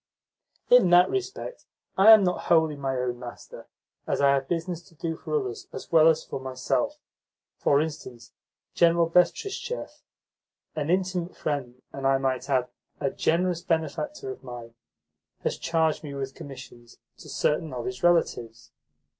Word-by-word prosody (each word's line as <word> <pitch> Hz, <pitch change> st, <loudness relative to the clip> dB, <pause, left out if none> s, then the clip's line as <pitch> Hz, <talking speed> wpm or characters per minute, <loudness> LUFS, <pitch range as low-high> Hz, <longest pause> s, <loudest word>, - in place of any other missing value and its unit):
"In 245 Hz, -7 st, +7 dB
that 175 Hz, +1 st, +6 dB
respect 390 Hz, +5 st, -5 dB, 0.3 s
I 195 Hz, +3 st, +6 dB
am 220 Hz, -2 st, +9 dB
not 180 Hz, -1 st, -1 dB
wholly 160 Hz, -3 st, +3 dB
my 135 Hz, -2 st, -2 dB
own 125 Hz, -1 st, -2 dB
master, 120 Hz, -1 st, -10 dB, 0.4 s
as -, -, 0 dB
I 140 Hz, -1 st, +5 dB
have 135 Hz, -1 st, 0 dB
business 170 Hz, +1 st, -3 dB
to 165 Hz, -, -23 dB
do 165 Hz, +1 st, -3 dB
for 455 Hz, -, -2 dB
others 395 Hz, 0 st, -6 dB
as -, -, -9 dB
well 160 Hz, -1 st, +6 dB
as 160 Hz, -1 st, +3 dB
for -, -, -6 dB
myself. 130 Hz, -, -2 dB, 0.6 s
For 140 Hz, -, +3 dB
instance, 145 Hz, -7 st, -5 dB, 0.4 s
General 170 Hz, 0 st, +4 dB
Betristchev 180 Hz, -, -1 dB, 0.7 s
an 150 Hz, -1 st, -2 dB
intimate 185 Hz, -1 st, -1 dB
friend 130 Hz, -4 st, -4 dB
and, 135 Hz, -1 st, -2 dB
I 135 Hz, 0 st, +4 dB
might 135 Hz, 0 st, -2 dB
add, 130 Hz, -2 st, +1 dB, 0.3 s
a 140 Hz, -2 st, -1 dB
generous 175 Hz, +1 st, 0 dB
benefactor 160 Hz, -5 st, -2 dB
of 130 Hz, -, -10 dB
mine 120 Hz, -2 st, -9 dB, 0.7 s
has -, -, -2 dB
charged 160 Hz, -2 st, 0 dB
me 145 Hz, -2 st, -7 dB
with 135 Hz, -1 st, -4 dB
commissions 125 Hz, -4 st, -12 dB, 0.2 s
to -, -, -12 dB
certain 155 Hz, 0 st, 0 dB
of 125 Hz, -2 st, -5 dB
his 125 Hz, 0 st, -5 dB
relatives. 120 Hz, -10 st, 0 dB
155 Hz, 155 wpm, -26 LUFS, 130-175 Hz, 0.7 s, am